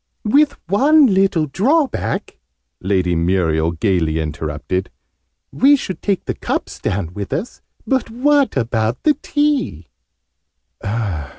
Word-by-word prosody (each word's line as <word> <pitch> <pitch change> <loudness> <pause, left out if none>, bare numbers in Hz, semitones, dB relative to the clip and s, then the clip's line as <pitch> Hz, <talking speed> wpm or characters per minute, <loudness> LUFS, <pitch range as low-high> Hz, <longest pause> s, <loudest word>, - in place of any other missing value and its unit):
"With 285 +6 +4
one 270 - +4
little 190 -4 +2
drawback!" 260 - -1 0.4
Lady 90 -2 +1
Muriel 85 -2 +1
gaily 80 -3 0
interrupted. 80 +4 -3 0.6
"We 280 +3 +5
should 190 -9 -5
take 200 -3 -1
the - - -2
cups - - -4
down 95 -3 -3
with 100 0 -6
us: 205 +10 -4 0.2
but 265 -4 0
what 275 - +2
about 115 -1 -1
the 305 - +4
tea?" 290 - -1
150 Hz, 110 wpm, -19 LUFS, -, 0.6 s, We